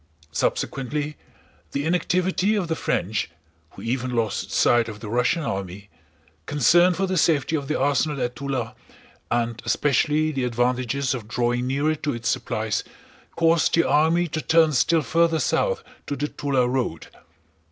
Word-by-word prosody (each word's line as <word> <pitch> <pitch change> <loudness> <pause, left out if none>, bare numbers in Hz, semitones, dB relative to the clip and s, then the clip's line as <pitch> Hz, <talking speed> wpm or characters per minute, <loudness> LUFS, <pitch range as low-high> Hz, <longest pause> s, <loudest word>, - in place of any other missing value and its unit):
Subsequently 145 - -2 0.6
the 140 +1 -1
inactivity 180 +4 +1
of 195 -5 -1
the 160 - -1
French 100 - -1 0.4
(who 95 - -11
even 125 +1 -2
lost 115 -3 -1
sight 120 -1 +3
of 105 -1 -8
the 105 - -7
Russian 125 +9 +1
army), 100 -3 -5 0.6
concern 175 +6 +4
for 195 - 0
the 185 -1 -1
safety 155 -1 +2
of 140 -3 -3
the 155 - -1
arsenal 145 +1 +1
at 125 0 -2
Túla, 130 -3 -3 0.6
and 120 -1 -1
especially 150 +2 +1
the 135 -3 -2
advantages 125 +3 0
of 115 -5 -6
drawing 120 +2 0
nearer 140 +4 +1
to 150 -3 -3
its 115 0 -2
supplies 110 -2 -1 0.5
caused 165 -1 +3
the 165 - +3
army 160 +5 +3
to 155 +1 -3
turn 160 -1 +4
still 160 +5 +3
further 165 +1 +2
south - - 0 0.2
to 145 - -2
the 145 +2 -2
Túla 135 -4 0
road. 125 -11 -2
140 Hz, 150 wpm, -24 LUFS, 120-160 Hz, 0.6 s, concern